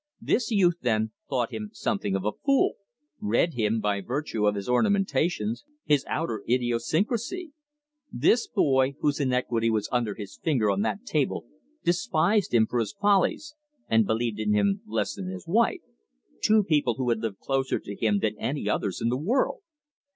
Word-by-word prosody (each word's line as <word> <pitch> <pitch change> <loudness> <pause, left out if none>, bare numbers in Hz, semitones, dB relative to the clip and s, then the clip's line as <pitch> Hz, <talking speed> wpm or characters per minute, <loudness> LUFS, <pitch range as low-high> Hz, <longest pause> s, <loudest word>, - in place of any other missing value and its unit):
This 245 - 0
youth, 180 -6 +3
then, 110 -2 0 0.2
thought 125 -3 -1
him 105 -1 -5
something 100 -1 -1
of 95 0 -2
a 105 - +1
fool: 275 - +2 0.5
read 210 -5 +1
him 110 -2 0
by 105 -2 0
virtue 120 -2 -1
of 105 - +2
his 100 -1 -5
ornamentations, 195 - +1 0.2
his 145 -3 +3
outer 115 -10 -2
idiosyncrasy! 200 - 0 0.6
This 235 - +2
boy, 135 - +2
whose 145 -1 +1
iniquity 125 -4 +1
was 110 -2 0
under 120 -5 0
his 100 -2 -9
finger 125 -10 +2
on 100 0 0
that 105 - -2
table, - - -1 0.4
despised 175 +2 +1
him 115 -2 +4
for 120 - -2
his 115 - -2
follies, 205 - +2 0.3
and 110 -2 +3
believed 110 -1 -1
in 105 -1 +1
him 195 - +2
less - - -1
than 195 -3 -6
his 185 -1 -6
wife 225 +7 +2 0.6
two 215 -1 +5
people 150 - +1
who 130 0 -2
had 115 -2 +1
lived 110 -3 -4
closer 135 +2 -1
to 100 - -8
him 105 -1 +1
than 110 -1 0
any 140 -6 -2
others 100 -2 -1
in 115 - +2
the 125 +2 -1
world. 255 - 0
125 Hz, 170 wpm, -26 LUFS, -, 0.6 s, two